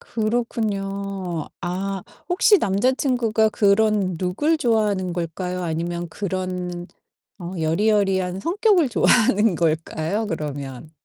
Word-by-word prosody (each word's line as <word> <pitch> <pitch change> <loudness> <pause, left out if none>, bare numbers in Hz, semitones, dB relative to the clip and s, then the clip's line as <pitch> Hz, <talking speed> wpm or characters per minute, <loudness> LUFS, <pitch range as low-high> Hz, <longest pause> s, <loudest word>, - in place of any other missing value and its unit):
그렇군요. 200 -6 -2
아 190 +2 -3 0.3
혹시 405 +3 +5
남자 200 - +2
친구가 235 -5 +1
그런 205 -3 +2
룩을 290 - +1
좋아하는 210 -7 +1
걸까요? 180 +2 -3
아니면 170 +1 -3
그런 180 -2 -4 0.5
어 175 -1 -7
여리여리한 190 +2 +1
성격을 355 - +2
좋아하는 220 -4 +3
걸까요? 165 +5 -1
그러면. 145 -5 -5
195 Hz, 255 characters per minute, -22 LUFS, 175-220 Hz, 0.5 s, 혹시